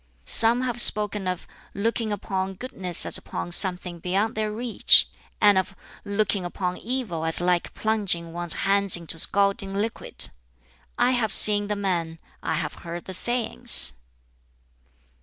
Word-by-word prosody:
"Some 230 +2 +3
have 240 -2 -1
spoken 210 -3 +2
of 180 -1 -5 0.3
'looking 225 +1 -3
upon 190 -1 -5
goodness 185 -6 0
as - - 0
upon 85 0 -8
something 180 - 0
beyond 195 +6 -2
their 215 0 -4
reach,' 230 +1 +3 0.3
and 205 -3 +3
of 190 +1 -6 0.3
'looking 200 -1 -3
upon 180 0 -5
evil 230 -9 -5
as 165 0 +7
like 175 0 -2
plunging 195 -7 -3
one's 175 -1 -2
hands 200 -2 +3
into 165 -1 -7
scalding 200 +2 0
liquid'; 220 +3 -3 0.7
I 250 - +1
have 235 -4 -2
seen 205 0 +5
the 210 - -3
men, 175 -5 -4 0.2
I - - -3
have 155 -2 -5
heard 170 0 -9
the 190 - -9
sayings. 240 +5 +5
195 Hz, 140 wpm, -23 LUFS, 175-215 Hz, 0.7 s, as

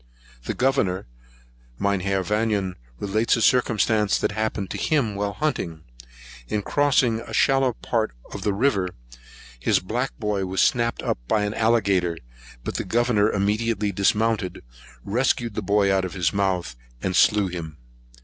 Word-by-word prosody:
The - - -3
Governor, 120 -8 +1 0.7
Mynheer 95 +1 0
Vanion, 105 -2 0 0.3
relates 110 +3 +1
a 115 - -2
circumstance 110 -4 +3
that - - 0
happened 110 -2 -2
to - - -3
him 140 -9 +1
while 100 0 -2
hunting. 85 - -2 0.6
In 105 - -2
crossing 130 -5 +2
a 115 - -7
shallow 135 -2 +3
part 110 -1 -2 0.2
of - - -6
the 105 - 0
river, 100 -4 0 0.6
his - - +2
black 120 +8 -3
boy 105 -5 -1
was 95 +1 -3
snapped 120 -2 +2
up - - -1
by 105 - +2
an 105 0 -1
alligator; 100 -7 +2 0.5
but - - -3
the - - -2
Governor 115 -3 +2
immediately 105 +1 0
dismounted, 105 +1 0 0.4
rescued 120 +1 0
the 110 - -3
boy 100 0 +2
out 95 -1 +2
of 95 +1 -5
his 85 -4 0
mouth, 95 -9 -1 0.3
and 95 -1 -1
slew 105 -2 +4
him. 85 -4 -6
105 Hz, 150 wpm, -24 LUFS, 95-115 Hz, 0.7 s, slew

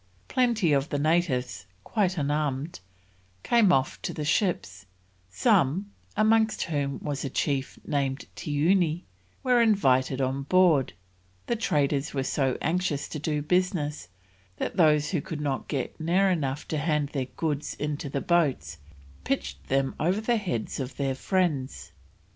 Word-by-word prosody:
Plenty 235 - +2
of 140 +3 +1
the 145 - -1
natives, 135 - 0 0.2
quite 195 -4 0
unarmed, 145 - -1 0.6
came 230 -5 +4
off 135 -5 +1
to - - -4
the 150 - -3
ships, 145 - -1 0.4
some, 140 - +2 0.3
amongst 220 0 +3
whom 145 -4 -2
was 145 -1 -3
a 140 - -2
chief 135 0 -1
named 140 -1 -1
Tioony, 165 +2 +1 0.4
were 250 -2 +4
invited 135 - +3
on 135 +1 0
board; 165 -3 +3 0.5
the 235 - 0
traders 145 -9 0
were 135 - 0
so 130 -1 0
anxious 165 -3 0
to 155 - -5
do 150 0 -1
business, 160 - 0 0.5
that - - -3
those 150 -3 +4
who 170 -6 0
could 160 -3 -6
not 140 -3 -2
get 140 +1 -3
near 185 +4 +2
enough 145 -5 -2
to 155 - -1
hand 150 -2 0
their 135 -3 -2
goods 150 +2 -3
into 150 -1 -3
the 140 0 -2
boats, 135 - +1 0.4
pitched 70 0 -3
them 135 0 +1
over 180 +6 +1
the 235 +2 +1
heads 160 - -3
of 130 0 -5
their 135 -1 0
friends. 150 -3 -1
150 Hz, 145 wpm, -27 LUFS, 135-180 Hz, 0.6 s, came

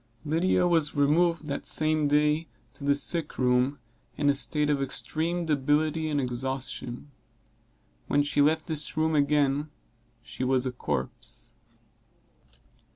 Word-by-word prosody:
Lydia 175 +3 +2
was 165 -4 +2
removed 160 +3 +2
that 140 -1 -4
same 155 -1 +1
day 150 +2 +2 0.3
to - - -13
the 140 0 +3
sick 160 +2 -1
room, 125 +2 +2 0.4
in 145 -1 +3
a - - +1
state 150 +1 -1
of 145 -2 +1
extreme 155 +7 -2
debility 155 +2 +1
and 145 -1 0
exhaustion. 130 +1 -4 1.0
When 145 - +2
she 145 0 +1
left 155 +2 +2
this 155 -1 -1
room 160 0 +2
again 145 0 +2 0.5
she - - -6
was 130 0 +2
a 130 - -1
corpse. 65 - -5
145 Hz, 130 wpm, -27 LUFS, 140-155 Hz, 1.0 s, the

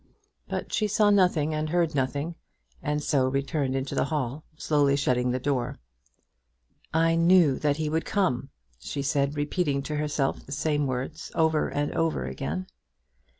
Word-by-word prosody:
But - - -4
she 215 - +2
saw 210 0 +3
nothing 180 -6 +3
and 155 0 -1
heard 170 -1 +1
nothing, 140 +4 -1 0.5
and 150 0 -1
so 135 -3 +2
returned 135 0 -1
into 135 0 -2
the - - +1
hall, 145 -1 -2
slowly 145 -3 +2
shutting 125 -3 +1
the 125 - 0
door. 130 -2 -1 1.1
"I 165 +1 +3
knew 165 -4 +5
that 145 -1 +1
he 155 -1 -1
would 160 +2 0
come," 140 -10 0 0.3
she 140 - -4
said, 140 +1 0
repeating 145 -2 0
to 150 +1 -3
herself 150 -2 -1
the - - -13
same 145 0 0
words, 130 +5 -4
over 160 -1 +2
and 145 0 -1
over 165 - 0
again. 75 +7 -4
145 Hz, 155 wpm, -27 LUFS, 135-160 Hz, 1.1 s, knew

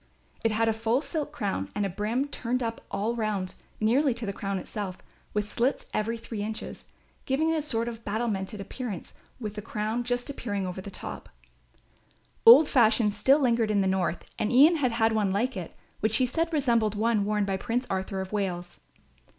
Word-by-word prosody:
It 225 - +3
had 225 +1 +1
a 225 - +3
full 225 +3 +1
silk 300 -2 -3
crown 195 - -2
and 205 - 0
a - - -1
brim 215 +9 -1
turned 250 -2 -2
up 230 0 -3
all 205 +4 -1
round 210 -5 -2 0.3
nearly 250 +4 +3
to 235 -1 -5
the 200 - -3
crown 195 0 -3
itself, 190 0 -5 0.3
with 210 0 -2
slits 245 +4 0
every 225 +2 -1
three 225 -2 -6
inches, 215 +1 -5 0.4
giving 310 +5 +2
it 325 - +1
a - - 0
sort 230 -6 -1
of 230 -1 -6
battlemented 210 -2 -2
appearance 205 0 -6 0.3
with 215 -4 -4
the 210 - -5
crown 220 +2 -2
just 245 0 -2
appearing 205 -8 -3
above 185 +1 -5
the - - -5
top. - - -7 1.2
Old 390 -10 +10
fashions 220 -5 +4
still 275 +2 +5
lingered 235 -4 +2
in 205 -2 +3
the - - +1
North 190 -2 0
and 210 - 0
Ian 295 +7 +7
had 255 -6 +1
had 225 -1 +3
one 210 -3 +1
like 235 +6 0
it, 180 -3 -6 0.2
which 220 +1 +3
he 255 - +3
said 330 +7 -1
resembled 235 -8 +2
one 220 0 +2
worn 210 0 +1
by 195 -1 -1
Prince 235 +6 -1
Arthur 190 0 -2
of 190 - -6
Wales. 180 -4 -3
220 Hz, 195 wpm, -28 LUFS, 200-245 Hz, 1.2 s, Old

